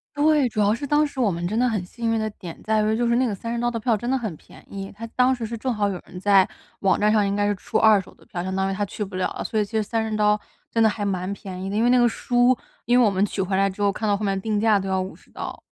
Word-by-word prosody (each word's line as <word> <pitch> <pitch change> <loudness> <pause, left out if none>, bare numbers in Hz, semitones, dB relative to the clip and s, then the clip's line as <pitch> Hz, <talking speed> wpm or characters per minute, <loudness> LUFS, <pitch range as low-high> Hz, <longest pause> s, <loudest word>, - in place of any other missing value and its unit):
对， 295 -2 +3
主 215 - -4
要 205 +1 +3
是 285 +4 -5
当 295 +2 +3
时 285 -2 -7
我 215 -6 +3
们 170 +1 -3
真 215 +4 -2
的 250 - +3
很 215 -6 -1
幸 230 +5 -3
运 225 - +1
的 220 - -1
点 175 -5 -10
在 215 0 +2
于 215 +1 +1
就 240 +1 +1
是 235 - +2
那 255 +2 +3
个 220 - -1
30 230 +4 -4
刀 240 0 +1
的 230 - -3
票 225 -1 +1
真 240 - -6
的 265 - +2
很 220 -9 -3
便 - - -17
宜， 195 0 -6
它 230 +2 -7
当 255 +1 +4
时 240 - -7
是 230 +1 -4
正 255 +2 -1
好 205 -1 0
有 185 -3 -4
人 180 - -10
在 195 -1 +5 0.3
网 195 - +2
站 210 +1 +3
上 210 -2 +3
应 200 - -1
该 205 0 +1
是 205 - +1
出 190 - -2
二 215 -2 +6
手 190 - -10
的 - - -22
票， 175 - -4
相 190 +1 -3
当 190 0 0
于 - - -1
他 205 +1 -1
去 210 - -5
不 195 -1 -7
了 185 - 0
了， - - -5
所 220 - -1
以 210 - +1
其 200 - -19
实 220 - 0
这 215 - +1
30 220 0 -2
刀 210 0 +3 0.3
真 230 - 0
的 - - +6
还 210 0 -2
蛮 190 -1 -2
便 190 -3 -8
宜。 - - -4
因 220 - +2
为 240 - +4
那 250 - +5
个 240 -1 +5
书 245 +2 +2 0.3
因 245 +2 +4
为 - - +6
我 215 - +5
们 195 +1 +1
取 205 - -3
回 190 0 0
来 195 - +3
之 195 +1 -6
后， 200 - +3
看 215 +2 -3
到 205 - +3
后 210 - -4
面 195 -1 0
定 210 +1 -1
价 220 -1 +4
都 195 -1 -3
要 190 0 0
50 185 +1 -9
刀。 - - -6
210 Hz, 350 characters per minute, -23 LUFS, 195-235 Hz, 0.3 s, 二